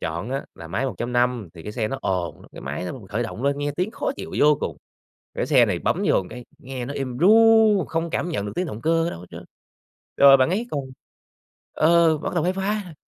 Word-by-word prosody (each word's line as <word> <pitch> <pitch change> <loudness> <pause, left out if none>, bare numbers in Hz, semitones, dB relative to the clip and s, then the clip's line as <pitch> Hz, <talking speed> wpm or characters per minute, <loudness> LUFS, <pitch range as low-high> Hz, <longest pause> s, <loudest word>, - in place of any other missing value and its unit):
chọn 85 +9 -4
á, 135 +1 -3
là 85 - -10
máy 100 +10 -1
1.5, 120 -1 -1
thì 80 - -11
cái 105 - -7
xe 110 -2 -2
nó 135 - -4
ồn 90 -5 -2
lắm, - - -16
cái - - -10
máy 70 +6 -5
đó - - -4
mà 130 - -8
mình 100 - -13
khởi 110 +3 -2
động 115 +1 -6
lên 140 0 0
nghe 145 0 -1
tiếng 185 +5 -1
khó - - -3
chịu 200 - -7
vô 150 0 +5
cùng. - - -3 0.6
Cái - - -2
xe - - +5
này - - -1
bấm - - 0
vô 95 - +2
cái 120 +1 -9
nghe 130 -1 -6
nó 140 - -5
êm 130 -3 -4
ru, 220 +1 +5
không 165 +1 -2
cảm 175 - -2
nhận 105 -11 -2
được 105 - -5
tiếng 180 +1 -1
động 115 -7 -7
cơ 165 +2 +2
ở - - -1
đâu - - -8
hết 90 - -11
trơn. - - -10 0.7
Rồi 140 -1 +8
bạn 130 +4 +3
ấy 220 +6 -1
còn 145 - -1 1.0
ờ, 165 0 +4
bắt 160 - -5
đầu 170 -2 0
khoái 180 - +1
khoái 195 +3 -1
rồi, 175 - -11
135 Hz, 255 wpm, -23 LUFS, 115-170 Hz, 1.0 s, Rồi